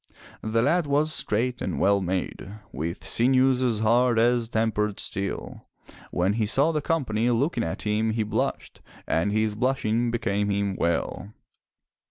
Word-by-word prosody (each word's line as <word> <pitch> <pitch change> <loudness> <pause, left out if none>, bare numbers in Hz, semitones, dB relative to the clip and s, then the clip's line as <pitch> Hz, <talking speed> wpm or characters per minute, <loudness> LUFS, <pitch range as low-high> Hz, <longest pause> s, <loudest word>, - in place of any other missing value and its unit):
The 115 +1 0
lad 170 +3 +2
was 150 +2 +1
straight 125 -1 -1
and - - -3
well 100 0 +3
made, 95 +1 -3 0.2
with 85 +3 -5
sinews 130 +1 +3
as 115 -4 0
hard 120 +2 +3
as 120 0 +2
tempered 105 -2 0
steel. 100 0 -4 0.4
When 90 +3 0
he 110 -1 0
saw 140 +9 +2
the 155 -2 -1
company 125 -8 0
looking 130 +8 0
at 80 - -4
him 105 +1 0
he 110 0 0
blushed, 105 +1 -3 0.2
and 90 +5 0
his 110 0 +1
blushing 120 0 0
became 105 -4 -1
him 100 -1 -1
well. 85 +5 -2
110 Hz, 150 wpm, -25 LUFS, 105-125 Hz, 0.4 s, well